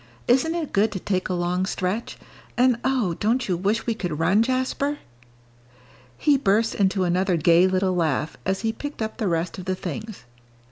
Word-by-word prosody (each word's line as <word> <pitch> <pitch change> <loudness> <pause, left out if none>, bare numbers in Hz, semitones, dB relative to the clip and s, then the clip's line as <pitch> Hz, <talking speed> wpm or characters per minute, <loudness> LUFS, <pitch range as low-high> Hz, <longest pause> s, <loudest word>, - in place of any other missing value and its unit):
"Isn't 270 +7 +3
it 330 -4 -4
good 210 +2 +3
to 190 - -3
take 185 -1 -2
a 180 - 0
long 180 +2 -1
stretch? 190 +6 -3 0.4
And 250 -1 +3
oh, 250 -9 +1
don't 235 +4 +1
you 185 - +1
wish 195 +5 -1
we 230 - 0
could 180 -8 -4
run, 180 +7 +3
Jasper?" 260 +4 0 1.2
He 290 -2 +3
burst 220 0 +2
into 195 -1 +1
another 180 0 +1
gay 170 +3 +5
little 185 0 +1
laugh, 160 -3 0
as 190 +1 -1
he 225 -1 -1
picked 290 -1 -5
up 220 - -5
the 215 - -1
rest 170 +2 -1
of 180 - -8
the 185 0 -1
things. 215 - -7
195 Hz, 185 wpm, -24 LUFS, 180-235 Hz, 1.2 s, gay